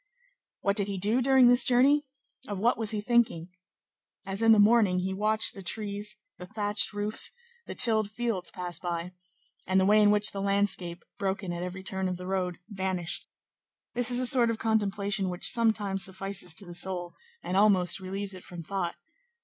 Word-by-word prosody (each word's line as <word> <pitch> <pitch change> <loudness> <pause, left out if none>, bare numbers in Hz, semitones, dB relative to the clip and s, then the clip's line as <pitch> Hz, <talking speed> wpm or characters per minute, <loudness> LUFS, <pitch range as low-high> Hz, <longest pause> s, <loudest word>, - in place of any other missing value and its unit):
What 200 -1 +1
did 200 -1 +2
he 200 -1 -4
do 210 +7 0
during 265 -1 +5
this 245 +1 +6
journey? 275 +4 +3 0.4
Of 205 - -4
what 230 +6 +2
was 220 -2 -2
he 210 -1 -2
thinking? 220 -7 +1 0.8
As 195 +2 -3
in 225 0 +5
the 220 - +6
morning, 205 -3 +4
he 190 +1 -2
watched 215 +2 +2
the 195 - -10
trees, 205 +2 -2 0.2
the 180 - -9
thatched 210 0 0
roofs, 205 +1 -1 0.4
the - - -7
tilled 220 -3 +2
fields 220 -5 -3
pass 175 -3 -6
by, 175 0 -4 0.6
and 190 +1 +3
the 190 - +2
way 210 +2 +5
in 205 - +5
which 210 0 +2
the 195 - -5
landscape, 195 -3 -1 0.2
broken 190 -2 -2
at 175 - -5
every 180 +1 -6
turn 190 0 -3
of 180 - -4
the 180 - -9
road, 185 -2 -2
vanished; 190 -4 -2 0.7
this 245 0 +1
is 245 - +2
a 255 - +1
sort 245 -2 +6
of 230 - -1
contemplation 205 -3 0
which 180 -1 -2
sometimes 210 -4 +1
suffices 190 -2 -4
to 195 - -3
the 175 - -10
soul, 175 -1 -3 0.3
and 180 - -3
almost 195 -3 +3
relieves 195 +1 -5
it 185 - -11
from 175 -2 -9
thought. 185 0 -3
200 Hz, 190 wpm, -28 LUFS, 185-220 Hz, 0.8 s, this